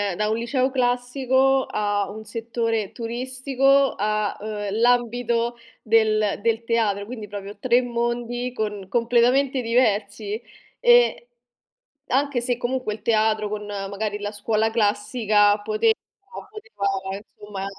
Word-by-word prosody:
da 210 +2 0
un 220 - +1
liceo 255 +2 0
classico 260 +1 +1
a 205 -1 -1
un 220 +1 -8
settore 225 -1 -2
turistico 260 +3 +1
a, 215 0 -1
uhm, 210 -1 -4
l'ambito 240 0 +1 0.2
del 215 -2 +2
del 230 0 +1
teatro, 210 -4 0
quindi 220 -3 -7
proprio 200 0 -8
3 245 +3 +3
mondi 240 +1 -2
con 210 -4 -4
completamente 245 +3 +2
diversi, 220 -2 0 0.4
ehm 485 0 +5 1.0
anche 280 -2 +1
se 245 0 -1
comunque 250 -3 -2
il 215 - -11
teatro 215 -1 +2
con 210 0 -5
magari 205 +1 -4
la 205 0 -4
scuola 215 +1 0
classica 210 -1 +2
poteva 440 - +2 0.6
poteva 200 - -3
insomma 205 -1 -9
230 Hz, 120 wpm, -23 LUFS, 210-250 Hz, 1.0 s, ehm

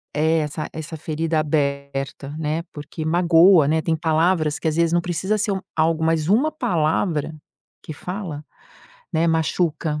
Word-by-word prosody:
é, 160 +2 +2
essa 150 +1 -3
essa 160 +1 -6
ferida 160 +1 -1
aberta, 140 -1 -2
né, 155 +2 -2
porque 150 +2 -7
magoa, 170 -1 +5
né. 160 +1 +2
Tem 160 0 0
palavras 160 0 +1
que, 160 - -2
às 155 - 0
vezes, 170 0 +2
não 175 - +3
precisa 185 +4 -1
ser 205 -1 0 0.2
algo, 160 0 +1
mas 160 0 +1
uma 270 +10 +3
palavra 160 - 0 0.5
que 155 - -7
fala, 180 -4 -6 0.7
né, 165 +1 +2
machuca 160 -1 0
160 Hz, 150 wpm, -22 LUFS, 150-170 Hz, 0.7 s, magoa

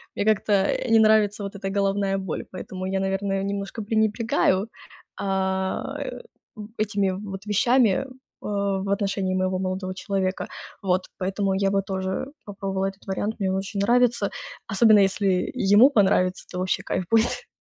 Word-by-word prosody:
Мне 205 - -1
как-то, 215 -1 +2
э, 200 +5 +1
не 225 - +6
нравится 215 -1 +4
вот 200 0 -6
эта 195 -1 -4
головная 195 0 0
боль, 190 -4 -4
поэтому 185 0 -6
я, 190 0 -1
наверное, 195 0 -1
немножко 200 +2 -4
пренебрегаю, 215 -2 +1 0.5
а, 190 -1 -1
э, - - -5 0.6
этими 200 -2 0 0.2
вот 195 +1 -7
вещами, 235 +2 +3 0.4
о 200 -2 -1
в 195 - -4
отношении 195 -2 0
моего 185 0 0
молодого 185 0 -3
человека. 190 -1 -2 0.4
Вот. 185 -1 +2 0.2
Поэтому 195 +1 0
я 195 0 +1
бы 195 0 +2
тоже 190 +4 -3 0.2
попробовала 195 -1 -3
этот 195 0 -9
вариант. 205 +3 -2
Мне 195 -2 0
он - - 0
очень 195 +1 -4
нравится. 240 -1 +3 0.4
Особенно 215 +1 +5
если 195 -1 +2 0.2
ему 235 +7 +8
понравится, 190 -6 +2
то 180 - -5
вообще 185 0 -1
кайф 185 - -2
будет. 225 0 +2
195 Hz, 155 wpm, -24 LUFS, 190-205 Hz, 0.6 s, ему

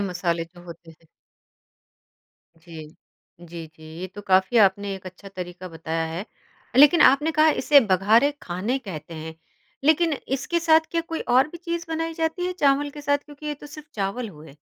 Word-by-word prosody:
मसाले 180 -3 -1
जो 175 +1 -17
होते 170 -1 -12
हैं। 165 +1 -21 1.5
जी। 165 -1 -11 0.5
जी, 170 -1 -9
जी 160 - -17 0.2
ये 185 - -4
तो 205 - -7
काफ़ी 190 +5 +3
आपने 200 -1 +3
एक 190 -1 -10
अच्छा 185 +2 -11
तरीका 185 -1 -8
बताया 165 0 -3
है 175 +5 -4 0.5
लेकिन 295 +5 +7
आपने 295 +4 +5
कहा 310 +1 +4
इसे 290 -2 +6
बघारे 215 +5 +3
खाने 190 +9 -2
कहते 170 - -8
हैं। 160 0 -7 0.5
लेकिन 320 +2 +3 0.2
इसके 280 +6 -1
साथ 320 -1 +4
क्या 335 - 0
कोई 330 0 -5 0.2
और 265 +3 +5
भी 345 - -10
चीज़ 340 0 -4
बनाई 325 0 -3
जाती 325 +2 -1
है 365 - -2
चावल 285 -4 +2
के 295 - -10
साथ 285 0 +1
क्योंकि 295 0 -11
ये 300 - -2
तो - - -8
सिर्फ़ 300 0 -12
चावल 205 +4 -3
हुए? 155 -5 -14
210 Hz, 180 wpm, -24 LUFS, -, 1.5 s, लेकिन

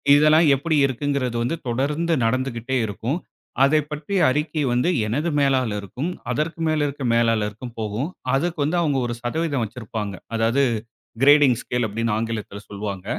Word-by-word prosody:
இதெல்லாம் 155 +2 +5
எப்படி 155 +4 -1
இருக்குங்கிறது 135 -2 -1
வந்து 125 - -1
தொடர்ந்து 145 +8 0
நடந்துகிட்டே 130 +1 -1
இருக்கும். 110 - -3 0.5
அதைப் 150 +2 +3
பற்றிய 150 +6 -2
அறிக்கை 150 +3 -1
வந்து, 125 +8 +2 0.2
எனது 145 +10 -1
மேலாளர்க்கும், 130 - 0 0.2
அதற்கு 155 +5 -2
மேல் 155 -1 +1
இருக்க 140 -1 -4
மேலாளர்க்கும் 115 0 0
போகும். 110 - -2 0.3
அதுக்கு 170 +4 -1
வந்து 155 +5 0
அவங்க 145 -4 +1
ஒரு 120 - -2
சதவீதம் 140 +1 -1
வச்சிருப்பாங்க. 110 -3 -5 0.2
அதாவது 115 +5 +2 0.6
கிரேடிங் 145 -2 +6
ஸ்கேல் 125 -1 -1
அப்படின்னு 115 +2 -2
ஆங்கிலத்துல 110 -2 -4
சொல்லுவாங்க. 100 -2 -5
130 Hz, 135 wpm, -23 LUFS, 115-150 Hz, 0.6 s, கிரேடிங்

